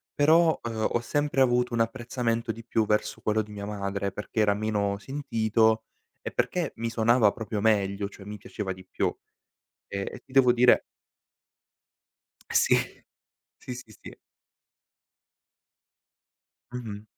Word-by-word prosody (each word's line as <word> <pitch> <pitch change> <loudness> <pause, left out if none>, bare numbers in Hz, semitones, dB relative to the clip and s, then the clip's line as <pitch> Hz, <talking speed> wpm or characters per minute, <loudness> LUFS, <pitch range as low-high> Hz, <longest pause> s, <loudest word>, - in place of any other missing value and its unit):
Però, 160 +3 +4
uhm, 110 -2 -1
ho 120 - +2
sempre 145 +2 0
avuto 125 -1 +2
un 115 - +2
apprezzamento 115 0 -1
di 115 +1 -9
più 110 -2 +1
verso 105 0 0
quello 110 0 +1
di 105 - -13
mia 100 -1 -6
madre 100 -1 -3
perché 105 +3 -5
era 100 -1 +4
meno 105 -2 -1
sentito 110 -3 +1 0.4
e - - -4
perché 175 -5 -1
mi 115 0 -2
suonava 115 -1 +4
proprio 110 -3 -4
meglio, 100 -2 +1
cioè, 100 -1 -13
mi 105 +1 -7
piaceva 95 -1 -5
di 95 0 -13
più. - - -2 0.7
Ehm, 100 -1 -3
e - - -10
ti - - -21
devo 130 -2 +5
dire 125 0 +5 1.7
Sì. - - +4 0.8
Sì, 125 - -7
sì, 110 -4 -11
sì. - - -10 2.6
Mh-mh. 110 -4 -6
110 Hz, 135 wpm, -27 LUFS, 105-125 Hz, 2.6 s, devo